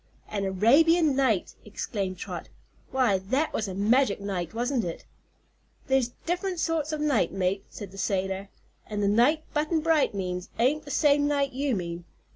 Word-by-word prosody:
"An 200 -2 -2
Arabian 285 - +4
Night!" 245 -9 +1
exclaimed 200 -3 -4
Trot; - - -6 0.4
"why, 250 -7 +2
that 260 +12 -1
was 215 - -1
a 190 - -5
magic 215 +3 +3
night, 190 -4 -3
wasn't 245 +1 -1
it?" 170 -1 -5 0.8
"There's 265 -3 +1
diff'rent 360 +1 -1
sorts 320 -2 0
o' 310 - -1
nights, 285 - +1
mate," 190 +1 -1
said 200 -3 -9
the 195 - -10
sailor, 195 0 -1 0.4
"an' 210 -1 -3
the 200 - +2
knight 250 +10 +3
Button 310 +2 +1
Bright 315 -7 +2
means 180 -2 -3
ain't 290 +6 +1
the - - -9
same 290 0 +3
night 280 -1 +1
you 270 -1 0
mean. 170 -2 -5
235 Hz, 165 wpm, -27 LUFS, 195-290 Hz, 0.8 s, Arabian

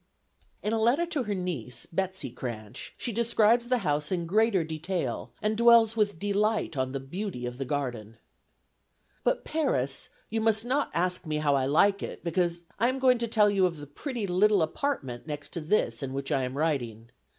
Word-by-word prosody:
In 210 - 0
a 225 - +1
letter 255 +10 +3
to 315 -6 -2
her 205 -1 -1
niece, 165 - -4
Betsey 190 -5 -3
Cranch, 110 -4 -7
she 240 - -3
describes 235 +1 +3
the 250 0 +2
house 150 +2 0
in 175 -2 -1
greater 205 0 +3
detail, 160 -3 -3
and 215 +1 +1
dwells 230 -1 +6
with 205 -5 +1
delight 205 0 0
on 130 -1 -1
the 135 - -3
beauty 145 -1 -5
of 125 +1 -6
the 135 - -2
garden. 120 -5 -4 1.1
"But - - +1
Paris, 195 - 0 0.2
you 225 0 0
must 220 0 +3
not 275 +4 +1
ask 180 0 0
me 155 - -1
how 150 -1 +2
I 135 -1 +1
like 195 +8 +3
it, - - -6
because 170 0 0 0.2
I 235 +3 +3
am 260 - -1
going 255 -2 +4
to 235 - -1
tell 210 -2 +4
you 190 -2 +3
of 165 -3 -6
the 145 - -8
pretty 230 - -5
little 195 +1 +3
apartment 155 - -3
next 145 -1 -5
to 170 - -5
this 155 - 0
in 135 -1 -4
which 135 0 -4
I 135 -1 +1
am 130 +2 -5
writing. 120 -7 -2
180 Hz, 195 wpm, -28 LUFS, 140-220 Hz, 1.1 s, dwells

